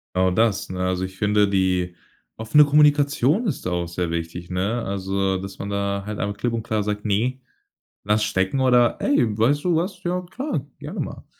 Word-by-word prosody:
Genau 95 0 +3
das, 110 +1 +1
ne? 90 0 -5
Also, 95 0 -1
ich 95 0 -10
finde 105 0 +3
die 90 -2 0 0.4
offene 115 +7 +4
Kommunikation 145 - +3
ist 175 - -3
da 90 - -1
auch 85 -1 -1
sehr 85 0 -3
wichtig, 85 +1 -5
ne? 100 +6 -1
Also, 95 -1 -1
dass 95 +1 -8
man 100 - -4
da 100 0 -2
halt 105 0 -5
einfach 100 0 -2
klipp 120 +1 -1
und 115 -1 -2
klar 110 -1 -1
sagt: 105 +1 -3
„Ne, 120 +6 0 0.6
lass 105 +1 +2
stecken.“ 105 +5 0
Oder: 125 -2 +4
„Ey, 115 - +2
weißt 140 +7 +2
du 175 -2 +2
was? 180 +4 -2
Ja, 180 +1 -1
klar, 260 +12 -4
gerne - - -7
mal.“ - - -7
105 Hz, 195 wpm, -23 LUFS, 95-130 Hz, 0.6 s, offene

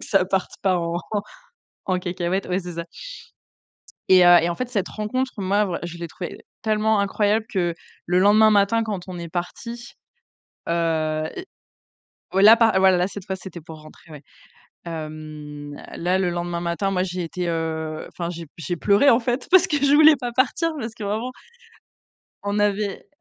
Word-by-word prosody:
que - - -8
ça 195 -3 +2
parte 190 0 -1
pas 190 -2 +2
en 170 0 -2 0.9
en 185 -1 +1
cacahuète. 180 +1 -2
Ouais, 185 +1 -1
c'est 175 -1 -8
ça 170 0 -4 1.2
et 185 -1 +7
heu, 175 0 +8
et 170 - +1
en 170 - -1
fait, 255 +4 -4
cette 205 -6 -2
rencontre, 255 +5 -2
moi, 195 -1 0
je 170 0 -6
l'ai 170 - -5
trouvée 175 +2 -7 0.2
tellement 215 -1 +2
incroyable 210 +2 +1
que 175 -4 0 0.3
le 180 +1 +2
lendemain 215 +3 +6
matin, 205 +2 +3
quand 205 -5 -4
on 180 -1 -6
est 170 0 -6
parti, 235 +8 -6 0.8
heu, 160 -2 0 1.1
ouais, 195 - +3
là, 220 +2 +9
par 225 -4 +3
ouais, 190 -1 +5
là 180 0 +2
cette 200 -1 -8
fois, 190 - -3
c'était 180 -2 -9
pour 160 0 -11
rentrer, 155 +1 -16
ouais. 150 -1 -10 0.6
Hem, 155 -2 -7 0.2
là, 180 +2 +1
le 185 -2 +1
lendemain 175 0 -3
matin, 175 +3 -1
moi, 185 -1 0
j'étais, 180 -1 -3
heu, 160 -1 -3
enfin, 170 -1 -5
j'ai 170 -1 -7
j'ai 165 -4 -8
j'ai 175 - -1
pleuré, 205 +10 +4
en 235 +1 +4
fait, 245 +2 -2
parce 375 -1 +6
que 300 - 0
je 280 0 +3
voulais 310 0 +7
pas 245 -2 -5
partir, 270 +6 +1
parce 225 -3 -5
que 215 - -7
vraiment 220 +5 -2 1.1
on 205 +1 -1
avait 205 -1 -1
185 Hz, 180 wpm, -23 LUFS, 170-215 Hz, 1.2 s, là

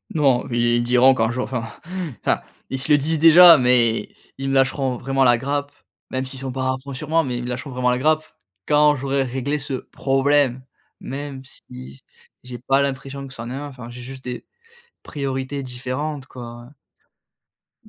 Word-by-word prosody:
Non, 135 -5 +2
ils 120 0 +2
ils 120 - 0
diront 125 +2 +5
qu'un 110 -3 +1
jour 125 +2 -2
enfin 125 -3 -3 0.6
enfin, - - +1 0.3
ils 135 - -2
se 130 +4 -1
le 145 - +7
disent 155 +3 0
déjà, 165 +1 +9
mais 125 -2 +3 0.3
ils 135 0 -2
me 135 - 0
lâcheront 135 -1 +1
vraiment 135 +1 0
la 120 -2 +5
grappe 140 +2 -3 0.4
même 130 0 -3
s'ils 130 0 -6
sont 135 0 -4
pas 130 0 -3
à - - -2
fond 140 - -7
sur 150 +3 -6
moi, 165 +1 +2
mais 125 -2 -3
ils 120 - -4
me 125 - -5
lâcheront 130 +4 -5
vraiment 125 -1 0
la 125 - 0
grappe 155 +2 +2 0.4
quand 150 0 +4
j'aurai 135 +1 -1
réglé 135 +3 -2
ce 140 0 -6 0.2
problème, 135 -1 +1 0.4
même 135 0 -7
si - - -14 0.3
j 70 - -18 0.4
j'ai 125 -1 -8
pas 135 +3 +1
l'impression 140 0 -4
que 130 - -12
ça 115 - -7
en 120 - -7
est - - -4
un, 145 +2 -5
enfin, 125 -4 -10
j'ai 125 +1 -10
juste 130 +1 -10
des 125 -1 -6 0.6
priorités 135 -1 -4
différentes 130 +3 -5
quoi, 120 -2 -10 1.2
heu. - - -16
135 Hz, 200 wpm, -21 LUFS, 125-140 Hz, 1.2 s, déjà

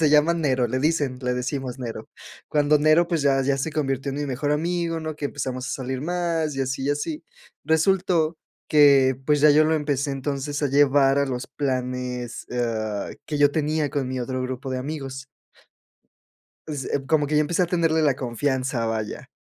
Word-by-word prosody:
se 155 -2 +4
llama 150 +3 +5
Nero, 130 -7 +1
le 130 +3 -1
dicen 145 -4 0
le 125 0 0
decimos 130 +1 -3
"Nero", 120 -3 -6 0.4
cuando 150 0 +3
Nero, 155 +3 +4
pues 165 -4 0
ya 135 -1 +3
ya 135 +1 +1
se 155 +4 -2
convirtió 135 -2 -1
en - - -5
mi 145 - -2
mejor 140 +2 -2
amigo, 165 +1 -1
¿no?, 155 -1 -4
que 145 - -2
empezamos 130 -3 -4
a - - -3
salir 130 -1 -4
más, 165 -2 -1
y - - -1
así, 135 +1 -3
y 145 - +1
así, 300 - -3 0.4
resultó 165 0 +2 0.3
que, 140 -3 +5
pues, 150 -1 +3
ya 150 - +8
yo 150 +2 +5
lo 160 +1 +2
empecé 145 -2 -1
entonces 140 +1 -3
a 145 - +2
llevar 140 0 +4
a 140 - +2
los 125 -2 -4
planes, 125 -3 -3
ah, 110 -4 -2 0.2
que 150 - -3
yo 145 -1 +5
tenía 155 -1 0
con 135 -3 -2
mi 130 -1 -3
otro 130 +1 -3
grupo 130 +1 -5
de 130 - -2
amigos 135 -1 -6 1.4
pues, 145 -4 -4
eh, 135 - -1
como 150 0 +2
que 150 - +1
yo - - +5
empecé 165 +4 +1
a 180 - +2
tenerle 165 -2 +1
la 140 -4 +3
confianza, 130 -1 -1
vaya, 110 -1 -4
140 Hz, 195 wpm, -24 LUFS, 130-155 Hz, 1.4 s, ya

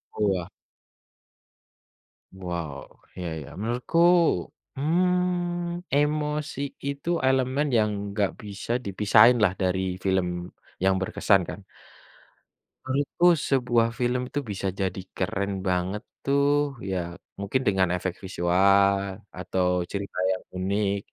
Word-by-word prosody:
Wah. 95 -5 0 1.9
Wow. 85 -6 -6 0.2
Iya 90 -2 -4
iya. 70 - -9
Menurutku, 120 +8 -2 0.8
mmm, 175 +2 0
emosi 150 0 0 0.3
itu 140 +3 -4 0.2
elemen 130 +2 +2
yang 105 -1 +2 0.2
enggak 100 -1 0
bisa 100 +2 -6
dipisahin 105 +5 +5
lah 95 -4 +4
dari 95 0 +1 0.2
film 90 -2 -1 0.3
yang 95 0 +4
berkesan 95 +1 +2
kan. - - -6 1.3
Menurutku 145 +6 +1 0.2
sebuah 120 -4 +3
film 125 +1 +1
itu 145 - -2
bisa 100 0 -3
jadi 95 0 -1 0.2
keren 100 +1 -1 0.2
banget 95 +4 -1 0.2
tuh, 140 0 +2
ya 95 - -1 0.4
mungkin 100 +7 0
dengan 95 -3 +3
efek 90 0 -2
visual 100 +2 +3 0.4
atau 90 0 -1 0.3
cerita 100 -2 -5
yang 95 - -3
unik. 100 +2 0
105 Hz, 105 wpm, -26 LUFS, 95-140 Hz, 1.9 s, dipisahin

